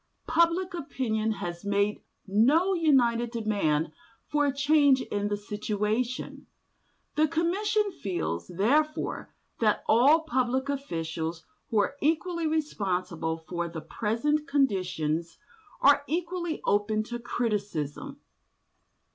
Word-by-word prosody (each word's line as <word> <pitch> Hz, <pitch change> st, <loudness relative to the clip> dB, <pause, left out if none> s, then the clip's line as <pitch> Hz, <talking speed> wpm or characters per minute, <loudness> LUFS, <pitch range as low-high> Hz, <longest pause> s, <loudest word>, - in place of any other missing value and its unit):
Public 340 Hz, +3 st, +2 dB
opinion 225 Hz, -9 st, -1 dB
has 175 Hz, -3 st, -6 dB
made 200 Hz, +1 st, 0 dB, 0.2 s
no 275 Hz, -, +3 dB
united 245 Hz, -8 st, +3 dB
demand 200 Hz, -10 st, 0 dB, 0.3 s
for 295 Hz, -1 st, +1 dB
a -, -, +2 dB
change 280 Hz, -1 st, +4 dB
in 205 Hz, 0 st, -2 dB
the 205 Hz, 0 st, -1 dB
situation. 210 Hz, +4 st, -3 dB, 0.7 s
The 310 Hz, +1 st, +4 dB
Commission 390 Hz, +6 st, +1 dB
feels, 85 Hz, -, -3 dB
therefore, 295 Hz, -, 0 dB, 0.3 s
that 215 Hz, -2 st, +2 dB
all 275 Hz, +9 st, +5 dB
public 260 Hz, -2 st, 0 dB
officials 165 Hz, -, -3 dB, 0.2 s
who 225 Hz, -, 0 dB
are 210 Hz, +7 st, +1 dB
equally 330 Hz, +2 st, 0 dB
responsible 185 Hz, -, -1 dB
for 170 Hz, +1 st, -4 dB
the 165 Hz, -1 st, -6 dB
present 265 Hz, -, -1 dB
conditions 180 Hz, -, 0 dB, 0.4 s
are 285 Hz, +1 st, +6 dB
equally 345 Hz, 0 st, -2 dB
open 210 Hz, +1 st, +1 dB
to 240 Hz, +2 st, -6 dB
criticism. 215 Hz, -, -3 dB
235 Hz, 105 wpm, -28 LUFS, 200-300 Hz, 0.7 s, are